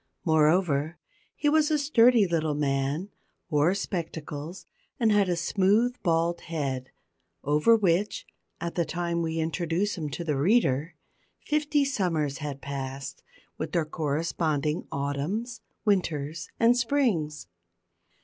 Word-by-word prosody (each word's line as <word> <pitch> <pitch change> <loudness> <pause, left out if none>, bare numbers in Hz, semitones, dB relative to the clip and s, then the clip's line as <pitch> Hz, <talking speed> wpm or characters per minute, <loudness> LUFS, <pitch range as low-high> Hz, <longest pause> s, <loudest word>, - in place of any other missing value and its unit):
Moreover, 160 -1 +2 0.4
he 295 - -1
was 305 +1 +4
a 310 - +2
sturdy 250 -6 +5
little 160 -3 0
man, 145 +6 -1 0.4
wore 150 +5 +3
spectacles, 165 -3 -5 0.3
and 225 -3 +3
had 205 -2 +3
a 175 - +1
smooth 205 +8 +2
bald 170 0 +1
head, 135 -6 -3 0.5
over 150 +11 +4
which, 200 -1 +1 0.3
at 170 0 -4
the 170 - +1
time 170 0 -2
we 165 -1 -2
introduce 170 +4 -1
him 150 -2 -3
to 160 +5 -5
the 150 -4 -1
reader, 155 - +2 0.5
fifty 295 -1 +1
summers 165 - -1
had 145 -3 -5
passed, 135 -1 -6 0.4
with - - -4
their 170 -3 +1
corresponding 155 0 -1
autumns, 150 - -3 0.2
winters, 165 -6 0
and 235 +1 +5
springs. 230 - 0
170 Hz, 120 wpm, -27 LUFS, 150-205 Hz, 0.5 s, sturdy